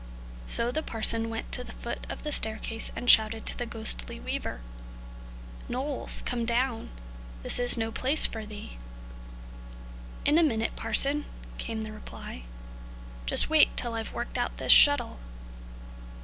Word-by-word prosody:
So 235 +1 +1
the 310 - -3
parson 225 -2 0
went 225 0 -7
to 250 - +3
the - - -12
foot - - -8
of - - -8
the 300 - -5
staircase 220 -2 0
and 245 - -7
shouted 220 -1 +4
to - - +3
the 245 - -6
ghostly 220 - -2
weaver: - - -6 1.1
"Knowles, 265 +2 0
come 245 -1 -3
down! 235 0 -2 0.5
This - - 0
is 245 0 +3
no 225 0 -3
place 265 +6 +5
for 220 -1 -3
thee." 210 - -11 1.5
"In 300 +3 +3
a - - +3
minute, 225 -7 -1
parson," 275 +7 0 0.3
came 225 -1 -5
the 215 - -8
reply; 65 - -11 0.8
"just - - +4
wait 315 -1 +3
till 240 -2 -1
I've 225 -1 -6
worked 240 - -6
out - - -4
this - - +2
shuttle." 285 -5 +6
230 Hz, 150 wpm, -26 LUFS, 220-255 Hz, 1.5 s, shuttle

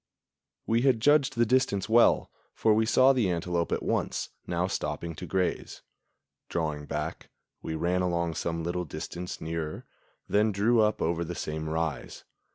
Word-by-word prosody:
We 115 +1 +2
had 130 -3 +3
judged 140 +1 +3
the 120 0 +3
distance 115 -6 +1
well, 115 +2 +4 0.2
for 110 - +3
we 110 +1 +2
saw 130 +3 +5
the 120 -7 +1
antelope 85 -1 -1
at - - -1
once, - - -1 0.2
now 85 +1 0
stopping 85 -2 -3
to - - -8
graze. 95 -1 -2 0.7
Drawing 75 -3 -2
back, - - -4 0.3
we 80 - -4
ran 90 +3 0
along 85 -2 0
some 85 0 -3
little 90 +1 -2
distance 85 +3 -6
nearer, 80 -1 -4 0.4
then 105 +1 +3
drew 110 +4 +3
up 105 0 +1
over 85 +1 0
the 85 +1 -5
same 80 0 -4
rise. 80 -2 -3
90 Hz, 160 wpm, -28 LUFS, 80-110 Hz, 0.7 s, saw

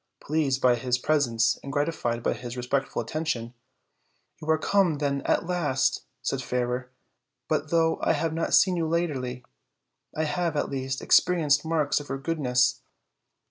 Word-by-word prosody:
Pleased 145 -4 0
by 125 -1 +5
his 125 +1 0
presence 120 -6 +1
and 140 - -7
gratified 145 -5 -1
by - - +1
his 125 0 -7
re 125 - -4
spectful 135 +2 -1
attention, 150 -7 -3 0.9
"You 155 - -7
are 160 - +4
come, 185 -1 +2
then, 140 -1 -1
at - - +1
last," 140 -7 0 0.2
said 135 - -1
Fairer; 125 0 -2 0.6
"but 155 - -1
though 165 0 +2
I - - +2
have 165 -1 -1
not 165 +1 +1
seen 185 -2 +4
you 165 -1 0
latterly, 135 -7 -2 0.7
I 155 - +1
have, 160 +1 -1
at - - -1
least, 130 -1 -3
experienced 150 -5 +4
marks 160 -3 +1
of 145 - -10
your 135 - -2
goodness." 125 -4 +1
140 Hz, 160 wpm, -26 LUFS, 125-160 Hz, 0.9 s, by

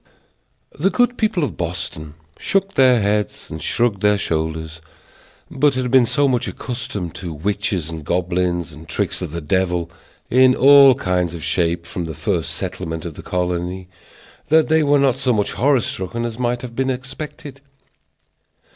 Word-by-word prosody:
The 175 +7 +1
good 245 +3 +2
people 215 -8 0
of 145 - -3
Boston 80 -3 -5 0.2
shook 195 0 0
their 130 -2 +5
heads 105 0 -1
and 80 - -6
shrugged 115 +2 0
their 105 -1 +3
shoulders, 80 -2 -3 0.7
but 140 0 +2
had 125 -1 -1
been 130 -3 +5
so 145 +2 +2
much 125 -3 0
accustomed 105 -8 -5
to 90 -3 -6
witches 95 +1 -2
and 80 -1 -7
goblins, 90 -1 -1
and 75 +1 -13
tricks - - -1
of - - -3
the 85 +2 -5
devil, 90 +1 0 0.4
in 130 +1 +5
all 140 0 +7
kinds 90 -3 -1
of 80 - -8
shapes, 85 -1 0
from 85 0 -4
the 80 -2 -6
first 85 -3 -2
settlement 80 0 -5
of 85 - -5
the - - -10
colony, 90 +1 -3 0.6
that 160 +1 +4
they 160 0 +4
were 145 -1 +4
not 135 -3 +2
so 130 -2 +1
much 105 -2 0
horror 135 0 +3
struck 95 -1 -4
as 115 0 -3
might 120 0 -1
have 120 -2 -8
been 135 +1 0
expected. 135 +2 -6
100 Hz, 165 wpm, -20 LUFS, 85-130 Hz, 0.7 s, all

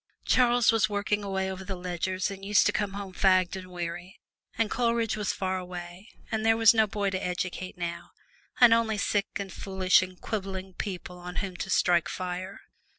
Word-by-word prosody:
Charles 245 -2 +4
was 220 -4 +2
working 205 0 -1
away 190 -1 -1
over 190 0 -7
the 190 0 -5
ledgers, 185 +2 -2
and 195 0 -9
used 205 0 +4
to - - +4
come 205 -2 -2
home 200 -2 -6
fagged 185 -1 +3
and 185 -1 -8
weary, 175 +1 -6 0.4
and 225 -2 +1
Coleridge 230 -2 +1
was 210 -2 -1
far 185 -1 -2
away, 180 +2 -8 0.2
and 220 -1 -1
there 225 0 +4
was 225 0 +7
no 220 -1 +3
boy 205 -1 -1
to 185 0 -3
educate 180 +1 -3
now, 170 -1 -5 0.5
and 240 -2 +8
only 225 -2 +2
sick 200 0 0
and 195 -2 -4
foolish 190 -2 +3
and 185 -1 -7
quibbling 190 -3 -4
people 180 -2 -6
on 180 0 -8
whom 190 -3 -3
to 190 - -4
strike 175 -2 +3
fire. 185 +1 -5
190 Hz, 190 wpm, -28 LUFS, 185-210 Hz, 0.5 s, and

